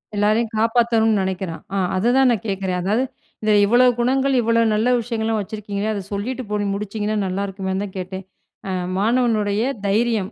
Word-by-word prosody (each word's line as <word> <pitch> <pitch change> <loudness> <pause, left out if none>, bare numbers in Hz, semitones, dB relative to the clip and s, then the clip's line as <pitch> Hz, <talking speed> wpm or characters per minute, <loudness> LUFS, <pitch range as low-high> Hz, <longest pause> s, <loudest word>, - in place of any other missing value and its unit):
எல்லாரையும் 215 +2 +1
காப்பாத்தணும்னு 225 -2 +2
நினைக்கிறான். 185 -3 -4
ஆ, - - 0 0.2
அததான் 245 +6 +3
நான் 225 -1 -1
கேக்கிறேன். 190 -2 -2
அதாது, 215 +7 +1 0.4
இந்த 215 0 +1
இவ்வளோ 245 +4 +5
குணங்கள், 265 +2 +2
இவ்வளோ 230 0 +2
நல்ல 235 +4 +2
விஷயங்கள்லாம் 225 -2 -1
வச்சிருக்கீங்களே, 210 +1 -4
அத 200 -2 -4
சொல்லிட்டு 250 +6 -3
போய் 205 -1 0
முடிச்சிங்கன்னா 210 +1 -3
நல்லாயிருக்குமேன்னு 195 0 -3
தான் 195 - -11
கேட்டேன். 190 +1 -6 0.4
ஆ - - -2 0.3
மாணவனுடைய 220 -2 +1 0.3
தைரியம். 220 -1 +1
215 Hz, 145 wpm, -21 LUFS, 200-230 Hz, 0.4 s, இவ்வளோ